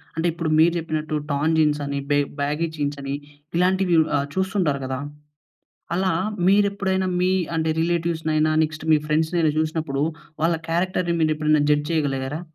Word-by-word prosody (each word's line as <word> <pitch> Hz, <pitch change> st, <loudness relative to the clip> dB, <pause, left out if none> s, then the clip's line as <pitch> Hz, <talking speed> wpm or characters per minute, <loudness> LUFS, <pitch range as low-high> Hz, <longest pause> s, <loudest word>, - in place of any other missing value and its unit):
అంటే 165 Hz, -, -1 dB
ఇప్పుడు 165 Hz, -2 st, -3 dB
మీరు 170 Hz, +1 st, +5 dB
చెప్పినట్టు 155 Hz, -1 st, -3 dB
టోర్న్ 145 Hz, +3 st, +1 dB
జీన్స్ 150 Hz, -2 st, +2 dB
అని, 140 Hz, 0 st, -2 dB
బె 145 Hz, -, +4 dB, 0.2 s
బ్యాగీ 150 Hz, +4 st, 0 dB
జీన్స్ 145 Hz, -1 st, -2 dB
అని, 140 Hz, 0 st, -4 dB, 0.4 s
ఇలాంటివి 185 Hz, -1 st, +2 dB, 0.2 s
ఆహ్, 140 Hz, 0 st, 0 dB
చూస్తుంటారు 185 Hz, -7 st, 0 dB
కదా! 130 Hz, 0 st, -3 dB, 1.0 s
అలా 185 Hz, -1 st, +1 dB, 0.4 s
మీరు 200 Hz, +1 st, +5 dB
ఎప్పుడైనా 190 Hz, -1 st, -1 dB
మీ 185 Hz, +1 st, +2 dB, 0.3 s
అంటే 160 Hz, 0 st, +1 dB
రిలేటివ్స్‌నైన, 160 Hz, -2 st, 0 dB, 0.2 s
నెక్స్ట్ 155 Hz, 0 st, -6 dB
మీ 155 Hz, -, +6 dB
ఫ్రెండ్స్‌నైన 160 Hz, +1 st, +1 dB
చూసినప్పుడు, 155 Hz, -3 st, -1 dB, 0.4 s
వాళ్ళ 165 Hz, +1 st, +3 dB
క్యారెక్టర్‌ని 175 Hz, 0 st, 0 dB
మీరు 155 Hz, 0 st, +3 dB
ఎప్పుడైనా 155 Hz, -1 st, +2 dB
జడ్జ్ 150 Hz, 0 st, +2 dB
చేయగలిగారా? 145 Hz, -1 st, -1 dB
160 Hz, 150 wpm, -23 LUFS, 150-170 Hz, 1.0 s, మీ